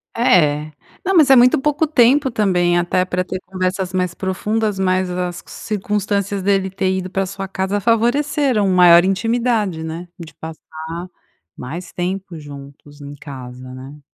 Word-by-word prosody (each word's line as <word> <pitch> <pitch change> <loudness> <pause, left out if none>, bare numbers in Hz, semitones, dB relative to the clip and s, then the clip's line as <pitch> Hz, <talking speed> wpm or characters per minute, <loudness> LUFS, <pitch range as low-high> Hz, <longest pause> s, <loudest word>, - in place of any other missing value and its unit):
É. 155 - +2 0.3
Não, 385 +1 +1
mas 310 -5 +6
é 270 - +8
muito 250 +1 +5
pouco 295 +3 +1
tempo 270 0 +4
também, 180 -6 +1
até 180 +1 +1
pra 180 0 -1
ter 185 0 -5
conversas 185 0 -2
mais 180 -2 -1
profundas, 210 +3 -2
mas 185 -1 +1
as 180 -1 -3
circunstâncias 200 -1 -2
dele 195 -1 +1
ter 190 0 -1
ido 185 0 -4
pra 195 +1 -1
sua 195 +1 -6
casa 190 +1 -2
favoreceram 240 +1 +1
maior 175 -2 +6
intimidade, 215 -3 0
né. 165 +2 -6
De 165 -2 -10
passar 160 +2 -8 0.5
mais 165 +8 -7
tempo 180 -1 -4
juntos 145 0 -12
em 145 0 -9
casa, 130 -3 -10
né. 135 +3 -11
185 Hz, 150 wpm, -19 LUFS, 170-210 Hz, 0.5 s, é